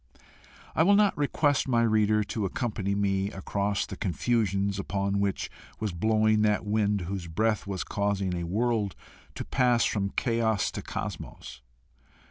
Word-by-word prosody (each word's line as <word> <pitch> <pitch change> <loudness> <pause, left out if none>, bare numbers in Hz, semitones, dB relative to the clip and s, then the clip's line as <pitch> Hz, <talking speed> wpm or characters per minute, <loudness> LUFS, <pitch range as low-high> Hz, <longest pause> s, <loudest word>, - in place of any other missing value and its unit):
I - - +2
will 200 +5 +6
not 205 -1 +4
request 145 -1 +1
my 120 -3 +3
reader 110 -1 +3
to 105 +1 -3
accompany 100 -1 -2
me 100 -1 +1
across 100 0 -2
the - - -7
confusions 100 +1 0
upon 100 0 -1
which 100 -1 -1 0.3
was 105 -2 -2
blowing 110 +3 +2
that 105 0 +2
wind 105 -1 +1
whose 90 0 -4
breath 110 +6 0
was 95 -2 -2
causing 100 -2 -1
a 85 -1 -3
world 110 +1 0 0.4
to - - -5
pass 125 -3 +3
from 100 -2 0
chaos 115 -2 0
to - - -5
cosmos. - - -6
105 Hz, 145 wpm, -28 LUFS, 100-115 Hz, 0.4 s, will